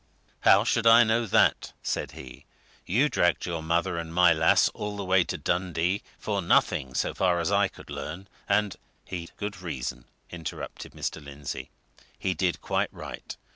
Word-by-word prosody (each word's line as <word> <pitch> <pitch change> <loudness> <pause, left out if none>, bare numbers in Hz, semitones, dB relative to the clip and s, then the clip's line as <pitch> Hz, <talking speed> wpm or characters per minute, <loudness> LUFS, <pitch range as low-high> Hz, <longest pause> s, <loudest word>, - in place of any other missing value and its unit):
"How - - +6
should 115 0 +1
I 115 +1 +9
know 115 +1 +1
that?" - - +3
said - - -2
he. 65 - -11 0.4
"You 125 +11 +3
dragged 90 - +1
your 85 -2 -3
mother 85 +1 0
and 80 -1 -6
my 90 +1 +5
lass 80 0 +4
all 105 0 -5
the 100 - -4
way 95 0 +4
to - - -3
Dundee 90 +2 0 0.2
for 100 -2 -2
nothing 65 -6 +2
so - - 0
far 90 -2 +2
as 90 - 0
I 100 0 +4
could - - -14
learn; 90 +5 -6 0.2
and 100 0 +2
" - - -41
"He'd 85 -2 -5
good 105 -2 -5
reason," 65 -7 -5 0.3
interrupted 80 -4 -7
Mr. 80 - -4
Lindsey. 70 0 -7 0.5
"He 95 - -1
did 90 -1 -1
quite - - 0
right. - - -8
90 Hz, 175 wpm, -27 LUFS, 85-100 Hz, 0.5 s, I